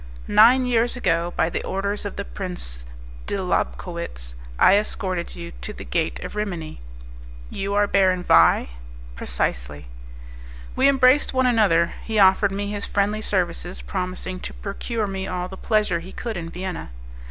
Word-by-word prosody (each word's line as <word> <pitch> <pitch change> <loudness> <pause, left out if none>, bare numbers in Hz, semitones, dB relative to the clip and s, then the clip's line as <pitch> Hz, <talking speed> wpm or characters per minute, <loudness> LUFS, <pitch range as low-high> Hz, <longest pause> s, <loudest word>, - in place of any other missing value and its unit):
"Nine 250 +4 +6
years 240 0 +2
ago, 170 -7 +1
by 165 - +2
the - - -3
orders 200 +2 -2
of 205 - -5
the 200 - -4
Prince 60 - -5 0.4
de - - -1
Lobkowitz, 60 0 -3 0.2
I 190 - +6
escorted 185 -4 -1
you 170 0 -7
to 210 - -4
the - - -9
Gate 165 -2 -1
of - - -7
Rimini." 175 - -4 0.7
"You 200 +1 -3
are 205 0 +4
Baron 185 -3 +2
Vais." 85 - +5 0.5
"Precisely." 60 +3 -3 0.9
We 265 - +4
embraced 265 0 +4
one 260 0 +3
another; 205 -9 +3
he 220 -1 -3
offered 195 0 +5
me 200 +1 -3
his 205 -1 -4
friendly 205 +1 0
services, 180 -3 -2
promising 185 0 -4
to - - -8
procure 215 +2 -3
me 190 -1 -4
all 180 0 -3
the 190 - -9
pleasure 210 -4 +1
he 180 +3 -10
could 230 +1 -5
in 165 -2 -5
Vienna. 180 - -5
190 Hz, 155 wpm, -23 LUFS, 170-210 Hz, 0.9 s, Nine